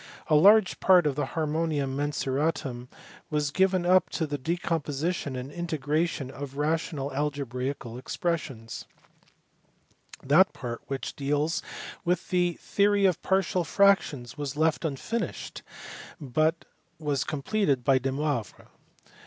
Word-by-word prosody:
A - - +3
largr 195 +5 +6
part 180 -3 +5
<>f - - +4
I - - 0
IK 135 - -2
//armonid 155 -2 0
Mvnxti/t 145 0 -2 0.4
d 140 - -3
rn/m 120 +1 -9 0.4
is 150 -1 0
givrn 185 0 +2
up 185 +1 +5
to 165 - -2
UK; 150 - -4
decomposition 160 -2 -2
and 130 +2 -5
integration 155 -3 -1
of 140 0 -8
rational 150 -2 -1
algebraical 135 -3 -3
expressions: 135 -7 -3 1.4
that 160 +8 +5
part 120 -2 -6
which 135 -1 -4
deals 145 +2 0 0.4
with 175 0 -1
the 175 -1 +2
theory 200 +3 +2
of 185 -4 +2
partial 190 -2 +1
fractions 165 -11 +2
was 145 -1 -4
left 160 0 +2
unfmishe 165 - -3
d, - - -8 0.6
but 155 +4 0 0.3
was 150 -3 -1
completed 145 - 0
by 135 +1 +4
Domoivro. 135 -2 -3
150 Hz, 130 wpm, -27 LUFS, 135-175 Hz, 1.4 s, largr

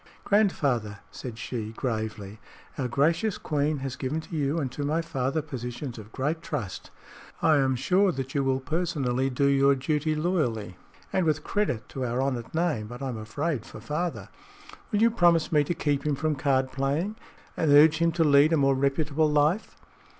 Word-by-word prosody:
"Grandfather," 140 - +1
said 120 -3 -7
she, 110 0 -5
gravely, 110 -4 -4 0.4
"our 130 - -2
gracious 165 - +1
Queen 150 0 -1
has 135 -1 -4
given 140 +4 -2
to 160 +1 -8
you 145 +1 0
and 135 -5 -2
to 145 - -4
my 150 +3 0
father 150 -2 -2
positions 125 -3 -6
of 105 +1 -12
great 150 +7 -2
trust. 105 - -5 0.5
I 155 -2 +4
am 135 -1 +2
sure 185 +9 +2
that 135 -3 -5
you 140 - +1
will 135 0 +1
personally 135 -5 -1
do 135 +2 0
your 140 0 +4
duty 150 +3 0
loyally, 150 - -1 0.4
and 190 - +2
with 155 -2 0
credit 125 - -1
to 135 - -4
our 120 0 -1
honored 130 -3 -2
name; 160 -11 0
but 120 +4 -8
I'm 125 -4 -3
afraid 135 +4 -2
for 110 - -11
father. 155 +9 -3 0.6
Will 210 0 +2
you 230 - +5
promise 175 -7 +3
me 150 -2 +4
to 175 - -2
keep 145 -3 0
him 150 -2 0
from 155 +3 0
card 135 -1 +1
playing 145 +10 -1 0.4
and 160 - 0
urge 150 +2 +7
him 170 0 +3
to 165 0 +2
lead 145 +1 +5
a - - +4
more 135 -1 +3
reputable 145 +3 +1
life?" 150 +7 +1
140 Hz, 180 wpm, -27 LUFS, 130-160 Hz, 0.6 s, urge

